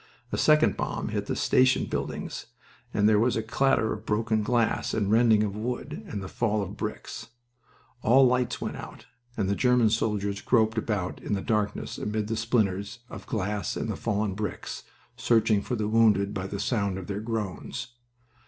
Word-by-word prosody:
A - - 0
second 155 0 +4
bomb - - -3
hit - - -3
the - - -1
station 130 +1 +3
buildings, - - -4 0.4
and 105 - +3
there 105 -1 +5
was 120 +3 +2
a 110 - -1
clatter 115 0 +2
of 110 - -8
broken 110 0 0
glass, 115 +1 +1
the - - 0
rending 110 +1 +4
of 100 -2 -2
wood, 125 - -4
and 105 - -5
the - - -5
fall 110 0 0
of 95 - -7
bricks. - - -5 0.7
All 130 +3 +6
lights 125 -1 +1
went - - -4
out, - - -10 0.3
and 100 -4 0
the 100 - +1
German 125 0 +3
soldiers 100 -3 -1
groped 110 -2 +2
about 100 -5 -3
in - - -3
the 100 - 0
darkness 105 -2 -1
amid 105 0 -2
the 115 - 0
splinters 105 -3 0
of - - -9
glass 105 -1 -2
and 115 - -3
the - - -3
fallen 105 -2 -1
bricks, 105 +2 -5 0.4
searching 110 -3 +3
for 125 - -3
the 110 -2 -1
wounded 105 -3 +3
by 95 -1 -3
the 100 0 -5
sound 100 -6 0
of 95 - -6
their 100 +2 -4
groans. 110 -1 -4
110 Hz, 180 wpm, -27 LUFS, 100-115 Hz, 0.7 s, All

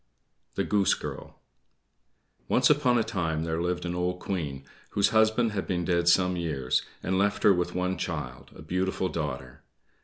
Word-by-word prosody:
THE - - 0
GOOSE 100 -1 +2
GIRL - - -8 1.1
Once 125 +3 +4
upon 135 -4 +3
a 115 - +2
time 85 -8 -2
there 80 0 -2
lived 90 +1 -2
an 85 - -2
old 90 +1 -1
Queen, 75 -10 -4 0.3
whose 100 - +3
husband 110 +1 +3
had 100 -2 -3
been 90 -2 -1
dead 85 0 +1
some 90 +1 +4
years, 75 -7 0 0.2
and 95 +1 0
left 100 +1 +1
her 100 - +7
with 90 -1 -2
one 90 +1 -1
child, 70 -8 -5
a - - -11
beautiful 95 +2 -1
daughter. 65 -3 -5
90 Hz, 165 wpm, -27 LUFS, 80-100 Hz, 1.1 s, her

